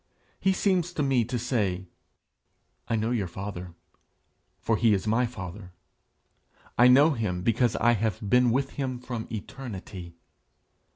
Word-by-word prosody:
He 195 - +3
seems 185 -2 +1
to 150 - -1
me 135 -3 +2
to 125 +2 -2
say: 105 -7 -1 1.0
'I 115 - 0
know 110 +1 0
your 110 -6 0
father, 90 -1 -7 0.8
for 115 - +1
he 110 -1 +4
is 95 - -3
my 115 +3 +2
father; 95 -4 -8 1.0
I 120 - +6
know 140 +5 +7
him 100 -9 -2
because 115 +2 +2
I 120 - +3
have 110 -3 0
been 125 +3 +4
with 135 +3 0
him 130 -3 -3
from 120 -2 -6
eternity. 100 -6 -7
115 Hz, 140 wpm, -27 LUFS, 100-125 Hz, 1.0 s, know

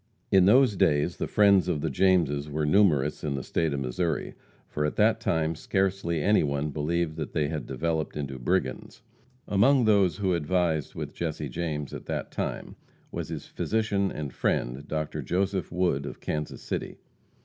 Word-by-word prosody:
In 95 -2 +6
those 120 +1 +5
days 80 0 +2
the - - -2
friends 100 -3 +4
of 80 -5 -1
the 80 - -1
Jameses 75 -3 +2
were 75 +1 -1
numerous 75 -5 +3
in 75 -3 -1
the 65 - -4
State 80 -2 0
of 70 -1 -2
Missouri; 80 +7 -2 0.3
for 75 - -3
at 75 - -1
that - - +3
time 80 0 0
scarcely 90 -1 -1
any 105 +1 +4
one 70 0 -1
believed 80 +2 -1
that 75 - -5
they 75 -3 0
had 80 -2 -4
developed 80 -2 -2
into 70 -3 -4
brigands. - - -2 0.4
Among 125 +6 +4
those 100 -6 +3
who 95 -2 +1
advised 85 -2 0
with - - -5
Jesse 75 -3 -3
James 75 0 -4
at - - -8
that - - -3
time - - -4 0.3
was - - -5
his - - -5
physician 105 -3 -1
and 75 -4 -5
friend, 65 +5 -1
Dr. 75 0 -3
Joseph 95 0 -1
Wood, 85 -6 0
of - - -8
Kansas 75 -1 -4
City. - - -4
80 Hz, 170 wpm, -27 LUFS, 75-95 Hz, 0.4 s, In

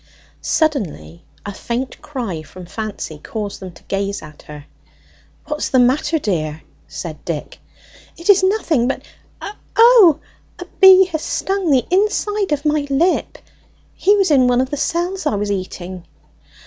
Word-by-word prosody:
Suddenly 180 - -2 0.2
a 205 - -5
faint 240 +6 -5
cry 235 - -5
from 180 +4 -12
Fancy 200 -6 -6
caused 205 +4 -6
them 185 -1 -8
to - - -18
gaze 200 -1 -3
at 150 -1 -13
her. 150 -1 -11 0.8
"What's 300 0 -3
the 260 - +2
matter, 265 +6 +2
dear?" 160 - -3 0.2
said 160 -4 -8
Dick. 160 -4 -5 0.6
"It 335 - -9
is 400 -2 +6
nothing, 375 - +1
but 270 - -3 0.4
O - - -5 0.3
o! 450 - +7 0.4
a - - -8
bee 380 0 +8
has 315 -2 -2
stung 385 0 -2
the 260 -4 +3
inside 415 0 0
of 295 0 -1
my 300 -1 +1
lip! 330 +7 +1 0.6
He 405 +2 +3
was 390 -5 +2
in 260 -3 +5
one 245 0 +2
of 260 +1 -1
the - - -1
cells 345 +4 -2
I 215 - 0
was 205 0 -2
eating!" 185 -2 -5
260 Hz, 155 wpm, -18 LUFS, -, 0.8 s, bee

